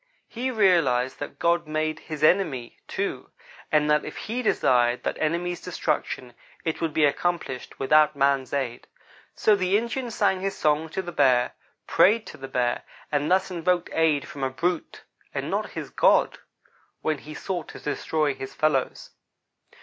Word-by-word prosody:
He 250 +3 -3
realized 170 - +2
that 145 - -6
God 170 -1 +1
made 155 0 -1
his 155 -2 -7
enemy, 155 -8 +2
too; - - -3 0.4
and 150 -1 +3
that 150 - +3
if - - -7
He 235 +4 -3
desired 125 - +2
that - - -2
enemy's 175 +3 -1
destruction, 150 -7 -2 0.3
it 160 0 -2
would 165 -2 0
be 150 0 +3
accomplished 145 -3 -2
without 150 +2 +4
man's 140 -2 +1
aid. 130 -4 -3 0.5
So 215 - +4
the 190 0 +2
Indian 235 +3 -3
sang 205 -4 +1
his 195 0 -2
song 155 +1 +1
to 190 +4 -3
the 175 - -6
bear, 130 -6 +3 0.3
prayed 215 +3 +4
to - - -10
the 135 - -7
bear, 125 -2 0 0.3
and 145 0 0
thus 190 +1 +2
invoked 175 0 0
aid 155 -3 +2
from 140 - -7
a 135 - +1
brute, 170 +6 -2 0.3
and - - -2
not - - -2
his - - -6
God, - - +3 0.6
when 155 -2 -1
he 155 +2 -10
sought 180 -2 -4
to - - -10
destroy 150 0 -1
his 135 0 -8
fellows. 150 -4 0
155 Hz, 165 wpm, -25 LUFS, 140-180 Hz, 0.6 s, without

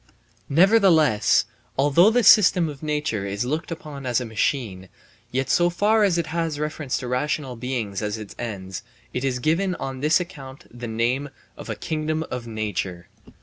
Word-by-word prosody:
Nevertheless, 165 - +4 0.3
although 145 +8 +5
the 245 +2 +2
system 180 -6 +6
of 145 -2 -9
nature 150 -10 -2
is 100 +4 -2
looked 155 +5 -2
upon 155 -6 -7
as 125 -1 +2
a 125 - -4
machine, 110 -4 -2 0.4
yet 130 +1 -1
so 175 +4 +3
far 210 +5 +2
as 190 -4 +3
it 170 - 0
has 165 -3 -1
reference 150 -2 -2
to 125 - -5
rational 130 +1 -2
beings 115 -5 -3
as 105 0 -2
its 105 -2 -9
ends, 95 -5 -5 0.3
it 125 - -2
is 130 -2 0
given 170 +8 0
on 135 -4 -5
this 150 +5 +3
account 140 -7 -9
the 120 0 -7
name 120 +6 -1 0.3
of - - -10
a - - -2
kingdom 155 0 -2
of 120 -2 -5
nature. 100 -5 -4
135 Hz, 170 wpm, -23 LUFS, 115-160 Hz, 0.4 s, system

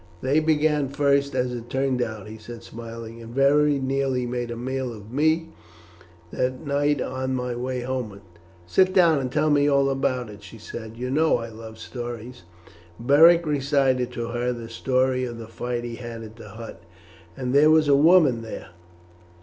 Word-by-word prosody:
"They 140 +4 +3
began 150 -2 +1
first, 140 0 +1
as 125 0 0
it 120 -1 -7
turned 130 -1 0
out," 110 -4 -4
he 110 +1 -9
said 115 +1 -10
smiling, 115 0 -9
"and 115 +1 -10
very 145 +1 +4
nearly 135 -1 -1
made 120 0 -3
a 120 - -4
meal 130 +1 -3
of 110 -1 -11
me 160 +4 +1 0.8
that 130 +4 -2
night 145 0 +1
on 130 +1 -2
my 125 -1 -2
way 125 +1 -3
homeward." 120 -6 -4 0.4
"Sit 185 - +2
down 170 -5 +5
and 130 -2 -3
tell 150 +2 +2
me 145 0 +4
all 140 -1 +3
about 130 -4 -1
it," 105 0 -12
she 110 +2 -12
said. 110 +1 -9
"You 125 +1 -4
know 155 +1 +3
I 115 -1 -6
love 110 0 -10
stories." 120 -2 -7 0.5
Beric 165 +7 +6
recited 135 -4 +1
to 115 -1 -4
her 120 +1 -1
the 115 -2 -7
story 130 +2 0
of 120 -2 -5
the 115 - -8
fight 120 +1 -4
at 115 -2 -8
the 105 - -12
hut. 115 +3 -10 0.6
"And 125 0 -3
there 145 +2 +6
was 155 -1 +4
a 140 - +5
woman 150 -5 +5
there! 110 -3 -8
125 Hz, 175 wpm, -24 LUFS, 115-140 Hz, 0.8 s, Beric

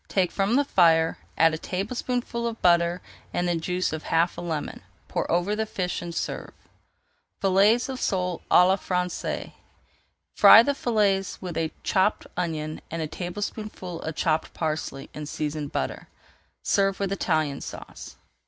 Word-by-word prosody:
Take 185 -3 +1
from 200 +4 +1
the 285 +1 +3
fire, 165 - +3 0.2
add 165 0 +5
a 155 - -3
tablespoonful 235 +5 -2
of 230 -1 -5
butter 170 0 +3 0.3
and 175 - +1
the 175 - +1
juice 180 +1 -1
of 160 - -4
half 165 +2 +1
a - - -6
lemon. 160 -4 -4 0.3
Pour - - -2
over 175 +5 +1
the 220 0 -2
fish 180 -3 -3
and 170 -1 -6
serve. - - -4 0.9
FILLETS 200 +5 +4
OF 260 -1 -5
SOLE 180 -3 -1
À 180 - +7
LA 190 +1 +3
FRANÇAISE 180 -2 -3 0.8
Fry 225 - +9
the 285 - +1
fillets 205 -7 0
with 180 -3 -6
a 160 -1 -1
chopped 190 +3 +1
onion 155 -3 -3
and 165 0 -3
a - - -3
tablespoonful 185 0 -5
of 160 -1 -5
chopped 160 -1 0
parsley 155 -3 -3
in 150 -1 -6
seasoned 150 -1 -3
butter. 65 - -3 0.6
Serve 195 -1 +2
with 195 -1 -1
Italian 155 -7 0
Sauce. - - -9
180 Hz, 155 wpm, -26 LUFS, 165-200 Hz, 0.9 s, Fry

